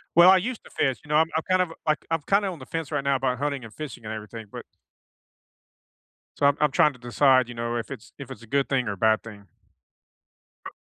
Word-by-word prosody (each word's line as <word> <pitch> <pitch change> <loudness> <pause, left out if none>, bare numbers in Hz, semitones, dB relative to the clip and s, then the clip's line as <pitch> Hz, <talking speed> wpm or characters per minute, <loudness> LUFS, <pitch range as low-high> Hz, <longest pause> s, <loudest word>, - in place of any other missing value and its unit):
Well, 175 +2 +8
I 190 - +7
used 225 +6 -2
to - - -15
fish, 130 -4 0
you - - -16
know, 150 - +2
I'm 160 +1 +5
I'm 160 - +1
kind 185 0 +4
of, 170 - -4 0.2
like 155 0 +1
I'm 165 -1 +1
kinda 200 0 +3
on 175 - -6
the 130 - -11
fence 165 -2 -5
right 145 - 0
now 140 0 +2
about 130 -2 -1
hunting 140 -3 -2
and 110 - -11
fishing, 145 -5 -8
and 110 - -5
everything, 110 +1 -8
but - - -7 1.7
So, 140 - +2
I'm 140 0 +4
I'm 150 -1 +3
trying 150 +2 +4
to 125 - -16
decide, 130 +1 +3
you 120 - -8
know, 120 0 -3
if 115 - -4
it's 110 - -9
if 140 -2 -9
it's 120 -3 -9
a - - -12
good 140 +3 0
thing, 130 -4 0
or 100 - -1
a - - -6
bad 110 +2 +2
thing. 105 -3 -12 1.2
Uh - - -7
135 Hz, 255 wpm, -25 LUFS, 120-155 Hz, 1.7 s, Well